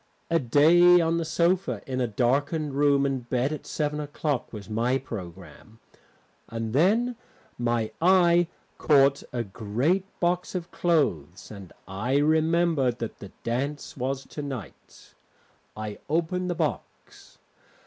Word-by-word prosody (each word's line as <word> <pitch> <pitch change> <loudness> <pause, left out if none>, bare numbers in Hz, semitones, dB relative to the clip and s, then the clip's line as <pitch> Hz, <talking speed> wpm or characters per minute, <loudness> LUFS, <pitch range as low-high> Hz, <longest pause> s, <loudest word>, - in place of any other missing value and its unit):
A 165 - +4
day 165 +7 +6
on 165 0 +1
the 165 - -1
sofa 170 +4 0
in 130 -3 -3
a 125 - +1
darkened 140 +7 0
room 140 0 +3
and 130 -3 -3
bed 130 +4 0
at 155 - -8
seven 150 -1 -2
o'clock 145 -2 -3
was 105 -3 -9
my 115 +4 0
programme. 100 -3 -10 0.7
And 115 -1 -4
then 220 - +2 0.4
my 120 -2 0
eye 175 -1 +5 0.3
caught 140 -2 +4
a 120 -1 -2
great 115 - -1
box 180 +1 -1
of 175 -2 -4
clothes, 105 - -1
and 100 -4 -10 0.2
I 105 +8 -1
remembered 155 -3 +2
that 115 -2 -6
the 100 - -9
dance 140 +5 -3
was 135 +1 -3
to 150 - -7
night. 130 - -9 0.6
I 105 -1 -6
opened 170 +3 -1
the 175 - -1
box. - - -5
140 Hz, 135 wpm, -26 LUFS, 120-165 Hz, 0.7 s, day